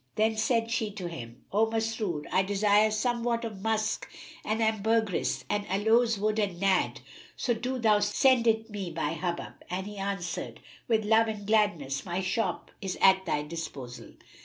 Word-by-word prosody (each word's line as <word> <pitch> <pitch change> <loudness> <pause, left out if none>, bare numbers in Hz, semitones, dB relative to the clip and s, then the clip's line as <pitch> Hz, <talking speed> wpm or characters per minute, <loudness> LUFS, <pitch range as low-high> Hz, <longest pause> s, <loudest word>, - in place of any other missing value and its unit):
Then 220 +1 +2
said 230 +1 +1
she 225 -2 0
to 185 -4 -5
him, 125 -7 -9
"O 215 +3 +3
Masrur, 220 -8 -2
I 185 - +4
desire 205 +2 +3
somewhat 235 +1 0
of 210 -4 -7
musk 220 0 -1 0.3
and 215 +1 -1
ambergris 220 -2 +1
and 205 0 0
aloes 225 +4 +3
wood 215 +2 0
and 195 -5 -1
Nadd; 195 -1 +1 0.4
so 240 - +1
do 250 +3 -3
thou 215 -3 +4
send 235 +4 +3
it 220 0 +2
me 200 -4 -4
by 160 -2 -2
Hubub;" 175 0 -3 0.2
and 185 +1 -3
he 210 0 -8
answered, 195 -3 -4 0.3
"With 220 -2 +2
love 225 +1 +4
and 210 -2 -5
gladness; 195 -11 +1
my 175 0 -3
shop 190 +5 -2
is 190 -2 -3
at 190 -1 +5
thy 150 -2 0
disposal!" 150 -6 -7
210 Hz, 165 wpm, -29 LUFS, 185-225 Hz, 0.4 s, at